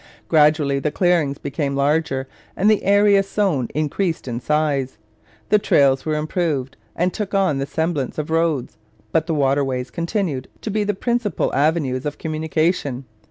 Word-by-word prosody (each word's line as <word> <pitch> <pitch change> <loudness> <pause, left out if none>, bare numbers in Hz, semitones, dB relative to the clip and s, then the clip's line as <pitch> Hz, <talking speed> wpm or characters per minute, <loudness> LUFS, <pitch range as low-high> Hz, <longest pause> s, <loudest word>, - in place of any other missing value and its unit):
Gradually 150 -3 +3
the 150 - -1
clearings 165 -5 +1
became 140 0 -3
larger 140 -1 0 0.3
and 205 +3 +3
the 215 - +2
area 200 0 +5
sown 195 - 0
increased 155 +2 -1
in 120 -1 -3
size. 140 -2 0 0.5
The 210 - +5
trails 135 -6 +3
were 155 - +1
improved 150 -4 -2 0.2
and 180 +1 0
took 205 -2 -3
on 185 -8 +2
the 135 - -2
semblance 160 -2 -2
of 155 0 -3
roads, 160 -9 0 0.3
but 160 0 +1
the 165 - 0
waterways 135 -3 0
continued 170 - -2
to 215 - -4
be 210 +1 0
the 205 -1 -1
principal 235 - -1
avenues 145 -3 +1
of 150 - -5
communication. 155 -3 -1
155 Hz, 155 wpm, -21 LUFS, 140-180 Hz, 0.5 s, area